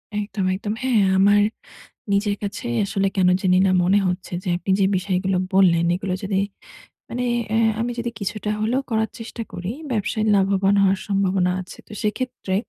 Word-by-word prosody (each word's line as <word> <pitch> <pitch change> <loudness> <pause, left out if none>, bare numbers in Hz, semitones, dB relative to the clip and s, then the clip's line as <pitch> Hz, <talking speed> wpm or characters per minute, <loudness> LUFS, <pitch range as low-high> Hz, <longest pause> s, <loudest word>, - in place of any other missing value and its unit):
একদম, 205 -2 -2
একদম। 205 +2 -3
হ্যাঁ, 250 -5 +3 0.2
আমার 205 +1 +5 0.7
নিজের 200 0 +1
কাছেই 195 -12 -3
আসলে 195 -1 0
কেন 185 -1 +4
জানিনা 185 +1 +4
মনে 190 +3 +4
হচ্ছে 180 0 -3
যে - - -5
আপনি 180 - -4
যে - - +4
বিষয়গুলো 185 0 0 0.2
বললেন, 175 -3 +4
এগুলো 185 +1 -2
যদি 195 -1 0 0.7
মানে 250 +1 -2 0.2
অ্যা 220 - +2 0.2
আমি 240 - -1
যদি 235 0 -2
কিছুটা 210 +1 -3
হলেও 245 +5 0
করার 220 -1 0
চেষ্টা 230 +1 -6
করি, 185 +5 -4 0.2
ব্যবসায়ে 215 0 -1
লাভবান 195 0 +2
হওয়ার 195 0 +2
সম্ভাবনা 195 -2 +1
আছে। 185 - -12
তো - - -12
সেক্ষেত্রে 215 -2 -2
195 Hz, 160 wpm, -22 LUFS, 190-215 Hz, 0.7 s, আমার